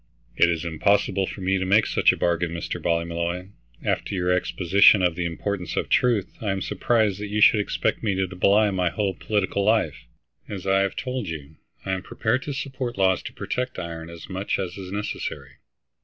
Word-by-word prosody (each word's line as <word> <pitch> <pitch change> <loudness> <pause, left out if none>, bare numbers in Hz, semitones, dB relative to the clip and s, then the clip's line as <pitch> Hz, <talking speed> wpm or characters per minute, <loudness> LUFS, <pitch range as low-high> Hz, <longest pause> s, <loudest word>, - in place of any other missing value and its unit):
"It 85 - +5
is 85 -1 -1
impossible 95 +3 +1
for 100 - -7
me 95 +1 +1
to - - -1
make 105 +3 +5
such - - +4
a - - -4
bargain, 85 0 +1
Mr. 85 -1 -4
Ballymolloy. 85 +2 -1 0.4
After 100 - -1
your 90 -1 0
exposition 95 +2 +4
of 90 -2 +3
the 90 +1 -3
importance 90 +2 -3
of - - -1
truth 115 -6 +1
I 105 - -2
am 95 -1 -1
surprised 110 -5 +1
that 105 - -4
you 105 +1 -2
should 105 0 +6
expect 105 - -1
me 100 -4 0
to 95 0 -2
belie 105 +3 +4
my 90 -2 +1
whole 100 +1 -1
political 100 +1 -1
life. 80 - +1 0.4
As 95 -3 -6
I 95 0 +3
have 100 0 0
told 125 -4 -3
you, 75 -2 -7 0.3
I 95 - -2
am 95 -1 -1
prepared 120 +6 -1
to - - -2
support 130 -2 -4
laws 95 -1 +3
to - - -8
protect 125 0 -3
iron 85 -2 -6
as 85 -1 -10
much 95 +1 -2
as 90 -2 -4
is 95 -2 -8
necessary. 105 +1 -5
95 Hz, 200 wpm, -24 LUFS, 85-105 Hz, 0.4 s, should